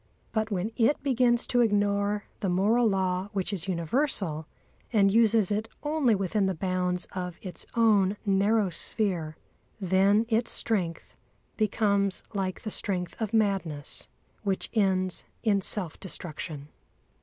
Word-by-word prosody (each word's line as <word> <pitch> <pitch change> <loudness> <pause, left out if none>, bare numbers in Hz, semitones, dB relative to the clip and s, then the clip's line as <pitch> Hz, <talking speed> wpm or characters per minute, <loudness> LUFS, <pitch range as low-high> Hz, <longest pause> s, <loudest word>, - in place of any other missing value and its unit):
But 220 -1 -1
when 200 +1 -2
it 255 +4 +2
begins 245 -3 +2
to 245 - +2
ignore 205 -1 +1 0.2
the 195 - -1
moral 215 +6 +3
law 190 0 0
which 195 0 -2
is 190 -1 -3
universal 175 - 0 0.4
and 200 -4 +4
uses 225 -3 +4
it 215 +2 -1 0.2
only 295 -6 +2
within 195 +1 0
the 190 - -1
bounds 180 0 -1
of 180 -2 -5
its 185 -3 -8
own 210 -4 +4
narrow 200 0 +2
sphere, 170 -3 -1 0.4
then 195 +3 +3
its 230 0 +1
strength 180 -7 -1 0.4
becomes 200 -2 +1
like 190 -2 -2
the 215 - -4
strength 180 -4 -1
of 215 -2 -1
madness 195 -10 0 0.3
which 195 -3 -2
ends 190 -4 +1 0.2
in 205 -3 +2
self 185 -4 -2
destruction. 155 -5 -6
200 Hz, 130 wpm, -28 LUFS, 185-220 Hz, 0.4 s, and